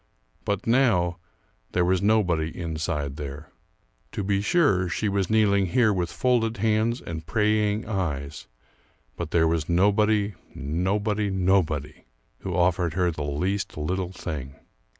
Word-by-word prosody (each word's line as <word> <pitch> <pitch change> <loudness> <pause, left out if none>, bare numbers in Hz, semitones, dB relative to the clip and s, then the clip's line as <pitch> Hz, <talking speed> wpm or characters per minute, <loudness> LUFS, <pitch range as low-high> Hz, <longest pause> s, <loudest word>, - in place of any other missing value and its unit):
But 100 -2 -1
now 110 -9 +2 0.5
there 90 - +2
was 95 0 +2
nobody 95 -7 +2
inside 75 -4 -3
there. 75 +2 -7 0.6
To 100 - -3
be 100 0 +1
sure 100 - +2
she 105 +4 -1
was 100 -2 0
kneeling 100 -3 +3
here 110 +4 +3
with 90 -3 -2
folded 115 -3 +1
hands 110 +3 +1
and 80 -1 -6
praying 105 0 +1
eyes; 75 -8 -3 0.7
but - - -5
there 80 -1 +3
was 80 -1 -1
nobody, 105 +3 +3 0.2
nobody, 100 +7 -1
nobody 90 -6 0 0.3
who - - -4
offered 85 -2 +1
her 90 -2 +2
the 75 - -6
least 90 +8 -2
little 90 +4 -2
thing. 75 -7 -6
95 Hz, 130 wpm, -25 LUFS, 80-105 Hz, 0.7 s, kneeling